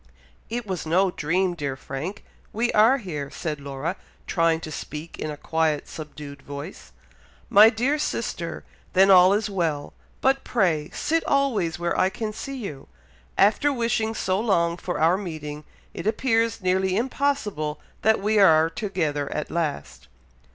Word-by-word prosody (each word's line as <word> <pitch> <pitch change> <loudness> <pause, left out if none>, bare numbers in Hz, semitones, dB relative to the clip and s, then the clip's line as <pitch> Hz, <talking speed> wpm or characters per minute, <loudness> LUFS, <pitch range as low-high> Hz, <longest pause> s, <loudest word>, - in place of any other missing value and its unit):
"It 240 0 -3
was 185 -5 -4
no 185 +3 +3
dream, 180 +4 0
dear 145 -5 -3
Frank! 135 +9 -6 0.3
we 235 +3 0
are 225 +6 +5
here," 155 - -5
said 150 0 -4
Laura, 140 +5 -4 0.3
trying 165 -2 +2
to 155 - -7
speak 155 +2 -7
in 155 - -3
a 150 - -5
quiet, 160 -1 0
subdued 150 -2 -9
voice. 140 0 -9 0.6
"My 210 +2 +9
dear 255 +7 0
sister! 300 - -3 0.3
then 195 +1 +6
all 185 0 +8
is 210 +1 +1
well! 165 -7 -2 0.3
but 270 +1 +2
pray 170 -10 +1
sit 325 +1 0
always 260 - +1
where 175 0 -1
I 185 - +3
can 215 +2 -4
see 270 +5 -6
you. 155 - -7 0.5
After 220 +9 +4
wishing 230 -3 0
so 185 -2 0
long 170 -7 +2
for 175 0 -4
our 165 +4 +4
meeting, 155 -5 -6 0.3
it - - -5
appears 225 -1 +1
nearly 185 +1 +1
impossible 225 - -1 0.2
that 220 +1 +3
we 210 +2 +2
are 160 -4 +6
together 160 -9 -2
at 150 - -4
last." 155 - -3
185 Hz, 150 wpm, -24 LUFS, 155-220 Hz, 0.6 s, My